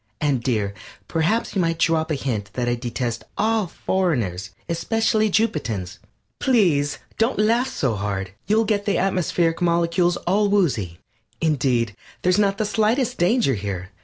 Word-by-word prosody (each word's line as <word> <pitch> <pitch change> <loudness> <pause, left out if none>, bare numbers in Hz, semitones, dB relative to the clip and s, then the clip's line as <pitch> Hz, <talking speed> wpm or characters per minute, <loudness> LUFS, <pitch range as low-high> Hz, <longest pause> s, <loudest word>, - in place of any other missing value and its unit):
And, 140 -5 +1
dear, 105 -5 -1 0.3
perhaps 170 +8 0
you 195 - +1
might 165 -1 0
drop 160 -1 +1
a 155 - +1
hint 110 -7 -3
that 125 -1 -2
I 120 - +2
detest 120 -1 -3
all 220 -1 +1
foreigners, 130 - -1 0.2
especially 215 +5 +1
Jupitans. 125 - -1 0.4
Please 170 - +2 0.2
don't 225 +3 +2
laugh 230 +4 +3
so 135 - -1
hard; 100 -2 -3 0.2
you'll 220 +2 +3
get 205 -2 0
the 200 - +1
atmospheric 175 -3 +1
molecules 170 +1 +2
all 200 +3 +2
woozy. 130 - +1 0.4
Indeed, 125 - +1 0.3
there's 180 +2 +3
not 200 -1 +2
the 215 - 0
slightest 220 +4 +1
danger 180 - +3
here. 95 -3 -4
170 Hz, 145 wpm, -22 LUFS, -, 0.4 s, laugh